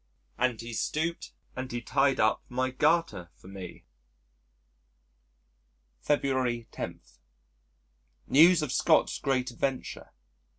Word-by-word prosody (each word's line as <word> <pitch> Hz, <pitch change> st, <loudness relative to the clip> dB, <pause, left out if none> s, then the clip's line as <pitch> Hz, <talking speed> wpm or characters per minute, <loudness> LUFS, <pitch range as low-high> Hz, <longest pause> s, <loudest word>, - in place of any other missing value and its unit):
And 120 Hz, -2 st, 0 dB
he 115 Hz, 0 st, -7 dB
stooped 160 Hz, +8 st, -2 dB, 0.2 s
and 130 Hz, 0 st, -5 dB
he 120 Hz, -, -3 dB
tied 135 Hz, +3 st, +1 dB
up 110 Hz, +1 st, +2 dB
my 130 Hz, +1 st, -1 dB
garter 150 Hz, -, +1 dB
for -, -, -17 dB
me." 95 Hz, -2 st, -10 dB, 2.1 s
February 130 Hz, -, 0 dB
10. -, -, -6 dB, 1.2 s
News 165 Hz, +3 st, +6 dB
of 145 Hz, -, -3 dB
Scott's -, -, +2 dB
great 130 Hz, -2 st, -1 dB
adventure! 130 Hz, +2 st, -4 dB
130 Hz, 100 wpm, -28 LUFS, 120-140 Hz, 2.1 s, News